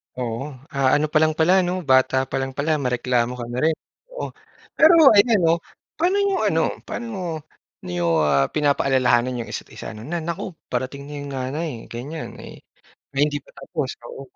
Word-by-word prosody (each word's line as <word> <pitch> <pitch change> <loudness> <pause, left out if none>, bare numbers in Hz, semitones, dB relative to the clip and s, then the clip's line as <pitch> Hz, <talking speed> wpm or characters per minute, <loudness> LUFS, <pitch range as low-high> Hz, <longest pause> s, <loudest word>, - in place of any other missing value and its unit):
Oo. 120 0 -3 0.3
Ah 135 -1 +2
ano 150 +1 +2
pa 155 - +3
lang 155 0 +3
pala 165 +4 +5
'no? 180 - -1 0.2
Bata 130 0 +4
pa - - -2
lang 135 0 -4
pala 155 +1 +1
mareklamo 125 -1 +1
ka 120 - -4
na 125 - -2
rin? 160 - +3 0.4
Oo. - - -4 0.5
Pero 320 +2 +7 0.2
ayan 215 +1 +5
'no, 165 - +5 0.5
paano 355 +5 +2
niyo 400 -1 +1
ano - - +2 0.3
paano 230 -3 -5 0.7
niyo, 90 -1 -2 0.2
ah, 70 -2 +3
pinapaalalahanan 130 -4 +2
'yong - - -10
isa't-isa - - -7
'no, 110 - -10
na, 170 +2 -2
"Naku! 170 +4 -4 0.2
Parating 130 +3 -3
na 145 - -9
'yong 145 0 -6
nanay", 135 +5 -3 0.2
ganyan, 145 +7 -6
eh, - - -10 0.6
may 135 - +2
hindi 145 -1 -1
pa - - -21
tapos, - - -3
oo - - -8
140 Hz, 175 wpm, -23 LUFS, 125-165 Hz, 0.7 s, Pero